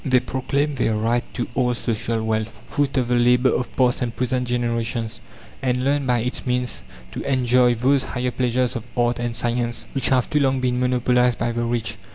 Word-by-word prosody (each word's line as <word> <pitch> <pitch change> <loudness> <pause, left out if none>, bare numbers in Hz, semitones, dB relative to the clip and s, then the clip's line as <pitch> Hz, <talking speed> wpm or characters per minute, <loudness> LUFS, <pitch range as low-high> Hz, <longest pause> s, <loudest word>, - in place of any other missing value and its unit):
They 130 -3 +3
proclaim 140 +4 -1
their 115 -4 0
right 115 +3 +1
to 120 - -2
all 125 -1 +1
social 115 -1 -2
wealth 110 0 -2
fruit 140 -1 -1
of 125 -2 +1
the - - +2
labour 125 +2 +4
of 125 - -2
past 125 -2 +2
and 120 -2 -2
present 125 0 -1
generations 115 -1 -2 0.4
and 125 -1 0
learn 140 0 +1
by 120 -2 +2
its 125 +2 -2
means 125 - -2 0.3
to - - -5
enjoy 125 -2 +3
those 130 +3 +2
higher 125 0 -2
pleasures 125 0 0
of 115 - -4
art 120 0 +1
and 120 -1 -2
science 120 0 -1
which 135 -3 +1
have 130 -2 +2
too 150 - +1
long 135 -2 +2
been 125 -1 0
monopolized 125 -1 +2
by 120 0 -1
the 120 0 -2
rich. 115 -3 -2
125 Hz, 200 wpm, -22 LUFS, 120-130 Hz, 0.4 s, labour